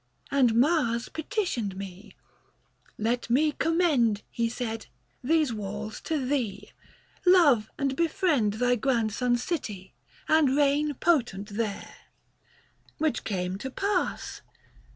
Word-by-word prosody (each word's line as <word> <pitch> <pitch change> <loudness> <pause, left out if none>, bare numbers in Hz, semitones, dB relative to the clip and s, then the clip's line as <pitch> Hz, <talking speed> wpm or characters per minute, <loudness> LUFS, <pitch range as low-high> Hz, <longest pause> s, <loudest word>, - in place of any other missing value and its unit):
60 - - -2
And 245 -5 +4
Mars 240 -3 +2
petitioned 295 - -2
me: 195 +1 -9 0.8
'Let 235 +3 -1
me 300 +6 +3
commend,' 295 - +2
He 230 -1 0
said, 225 -2 -4 0.2
' - - -42
these 305 -2 +2
walls 210 +1 -5
to 305 -5 -1
thee; 250 -7 -2 0.5
love 315 - +5
and 275 -1 -1
befriend 310 - +1
Thy 245 +3 +2
grandson's 240 0 0
city, 210 - -4 0.3
and 295 -4 +4
reign 290 +1 +2
potent 240 - +1
there.' 210 -1 -4 1.0
Which 310 -1 0
came 185 -2 -3
to 265 - -5
pass. 390 +7 -2
245 Hz, 115 wpm, -27 LUFS, 215-300 Hz, 1.0 s, love